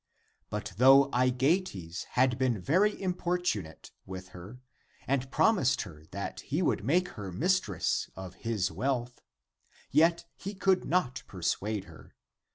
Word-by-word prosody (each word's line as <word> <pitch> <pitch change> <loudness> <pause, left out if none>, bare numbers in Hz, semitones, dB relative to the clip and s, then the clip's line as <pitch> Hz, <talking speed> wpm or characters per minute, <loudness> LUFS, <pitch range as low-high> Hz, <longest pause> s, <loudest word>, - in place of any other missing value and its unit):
And 105 0 -2
though 135 +3 +7
Aegeates 125 - 0
had 125 0 +2
been 125 -5 +1
very 185 - +2
importunate 180 - -2 0.2
with 95 0 -7
her 95 +7 -11 0.5
and 135 0 0
promised 135 - +3
her 80 -6 -12
that 100 +1 -5
he 155 +6 -1
w^ould - - +1
make 175 - +1
her 100 -3 -7
mistress 185 - 0
of 95 -2 -8
his 105 -5 -1
wealth, 125 +1 -2 0.7
yet 165 +4 +4
he 200 +2 -7
could 190 -1 +2
not 135 -8 0
persuade 95 +3 -2
her. - - -15
125 Hz, 130 wpm, -30 LUFS, -, 0.7 s, though